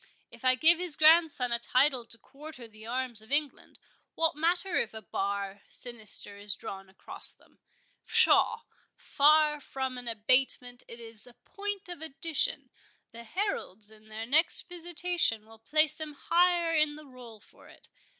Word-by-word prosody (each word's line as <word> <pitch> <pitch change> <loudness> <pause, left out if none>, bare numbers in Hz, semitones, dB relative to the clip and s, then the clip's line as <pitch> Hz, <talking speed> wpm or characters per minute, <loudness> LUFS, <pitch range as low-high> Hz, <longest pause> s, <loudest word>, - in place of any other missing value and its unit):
If - - -15
I 255 0 +4
give 325 +5 +4
his 355 -4 +2
grandson 310 -5 +4
a 235 - +1
title 255 +1 +1
to 230 - -5
quarter 275 +2 -13
the 220 0 -14
arms 250 -2 -3
of 220 +4 -17
England, 290 -1 -2 0.4
what 325 -2 0
matter 345 +4 -1
if 225 -1 -2
a 220 - -8
bar 200 0 -4
sinister 220 -4 -1
is 205 0 -1
drawn 195 0 -9
across 190 - -2
them?—Pshaw! - - 0 0.3
far 300 +1 +3
from 265 -2 -5
an 245 - -9
abatement, 245 +2 +1
it 235 - -5
is 225 0 -5
a 245 - -17
point 405 -1 -6
of 350 -3 -9
addition—the 280 -6 -1
heralds 220 - -5
in 215 0 -19
their 220 +1 -7
next 305 +8 +5
visitation 345 -9 -2
will 225 0 -17
place 305 +5 +1
him 305 -1 -6
higher 345 +2 +1
in 305 -1 +2
the 305 0 -13
roll 245 -5 -14
for - - -20
it. - - -16
260 Hz, 155 wpm, -29 LUFS, 225-315 Hz, 0.4 s, next